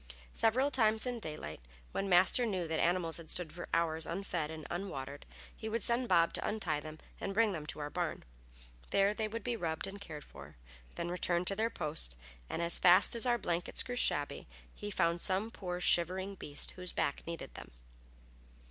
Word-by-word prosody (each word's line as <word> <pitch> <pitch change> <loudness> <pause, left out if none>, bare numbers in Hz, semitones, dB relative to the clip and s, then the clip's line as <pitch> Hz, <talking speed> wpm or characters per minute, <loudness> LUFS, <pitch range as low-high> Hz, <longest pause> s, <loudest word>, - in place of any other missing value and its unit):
Several 255 +6 +2
times 220 -3 +3
in 245 -2 -2
daylight, 150 - -6 0.3
when 195 0 -2
Master 185 +7 +5
knew 190 -7 -1
that 160 0 -1
animals 170 -1 +1
had 165 -2 -10
stood 170 -4 0
for 175 - -6
hours 165 -1 +1
unfed 175 -3 -2
and 160 -1 -7
unwatered, 145 -7 -5 0.3
he 220 - -5
would 225 -1 -1
send 240 +1 +1
Bob 170 0 +4
to - - -1
untie 180 -9 -1
them 155 +1 -8 0.2
and 195 -1 -3
bring 225 -1 +4
them 155 -5 -5
to - - -3
our 145 0 -4
barn. - - -2 0.7
There 200 +1 +3
they 215 0 -1
would 230 +2 -5
be 245 -1 -1
rubbed 165 -6 -2
and 200 +1 -8
cared 150 -6 -7
for, 70 +1 -12 0.4
then 170 0 -3
returned 175 0 +2
to 195 - -1
their 220 +3 +1
post; 150 - -1 0.3
and 170 - -2
as 170 0 +4
fast 180 +5 +6
as 235 +2 +2
our 240 -1 +3
blankets 175 -5 0
grew 245 - -4
shabby - - +2 0.3
he 205 - -6
found 170 -3 +1
some 200 +4 +1
poor, 180 -4 -4
shivering 185 +3 +2
beast 145 -6 -2
whose 180 -1 -5
back 140 - -1
needed 170 0 -6
them. - - -9
180 Hz, 190 wpm, -34 LUFS, 160-215 Hz, 0.7 s, fast